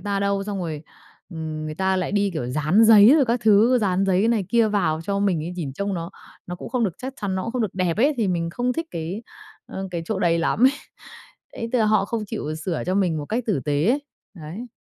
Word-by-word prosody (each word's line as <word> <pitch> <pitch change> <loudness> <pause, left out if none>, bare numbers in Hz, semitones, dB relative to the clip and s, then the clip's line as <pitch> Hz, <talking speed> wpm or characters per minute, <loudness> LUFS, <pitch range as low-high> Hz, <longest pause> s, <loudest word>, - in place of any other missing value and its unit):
ta 200 -1 -2
đâu, 200 0 0
xong 205 -2 -4
rồi, 160 -4 -4 0.5
ừm, 160 -2 -5
người 155 - -5
ta 190 +2 0
lại 185 +1 -2
đi, 200 -1 +1
kiểu, 125 -7 -3
dán 155 - +3
giấy 220 +4 +8
rồi 280 - +4
các 235 0 0
thứ, 220 +4 +5
dán 195 -2 +1
giấy 190 +4 +2
này 220 -5 +1
kia 230 +1 +3
vào 175 -7 0
cho 200 +2 -1
mình 190 -6 +1
ấy, 175 - -4
nhìn 145 -6 -4
trông 200 +5 -3
nó 170 +1 -5 0.4
nó 175 - -5
cũng - - -8
không 250 -3 0
được 185 -5 -2
chắc 260 +1 -6
chắn, 200 -2 -2
nó 185 - -2
cũng 230 - -4
không 250 - -1
được 210 -5 -3
đẹp 180 -3 0
ấy, 280 +6 +3
thì 215 -5 0
mình 170 -2 -1
không 245 +5 -1
thích 330 +3 -4
cái, 170 +7 -5 0.4
ơ, 190 0 -6
cái 170 -2 -3
chỗ 200 +3 -3
đấy 170 -2 +2
lắm 215 +8 +1
ấy. 265 - +6 0.8
Đấy, 230 0 -5
tức 250 - +3
là 220 - +3
họ 210 -2 +3
không 225 -1 -3
chịu 155 -8 -4
sửa 160 +1 -3
cho 185 - 0
mình 180 -5 +1
một 145 - -4
cách 235 +7 -2
tử 195 -9 +1
tế 150 +2 +1
ấy, 280 +3 +1 0.3
đấy. 175 +8 -8
195 Hz, 260 wpm, -23 LUFS, 170-220 Hz, 0.8 s, giấy